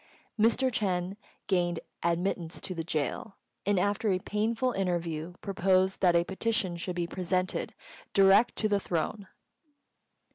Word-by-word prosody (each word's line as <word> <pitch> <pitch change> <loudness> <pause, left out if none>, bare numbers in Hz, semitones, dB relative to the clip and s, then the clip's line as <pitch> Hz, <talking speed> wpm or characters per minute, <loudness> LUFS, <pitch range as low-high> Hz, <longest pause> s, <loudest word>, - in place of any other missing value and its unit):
Mr. 235 +4 +3
Ch'êng 190 -4 -1 0.3
gained 175 -3 +1 0.2
admittance 170 0 -1
to 185 - -4
the 165 -2 -3
gaol, 160 +5 -2 0.3
and, 205 -1 +3
after 205 +3 +1
a 185 - +2
painful 225 +6 0
interview, 175 -4 -2
proposed 190 -1 +1
that 180 -2 +4
a 170 - +4
petition 195 -1 -1
should 175 +1 -4
be 175 -1 0
presented 185 +1 -2 0.4
direct 195 +4 +5
to 215 - +1
the 205 -1 +2
Throne. 190 +3 -2
185 Hz, 135 wpm, -29 LUFS, 175-205 Hz, 0.4 s, direct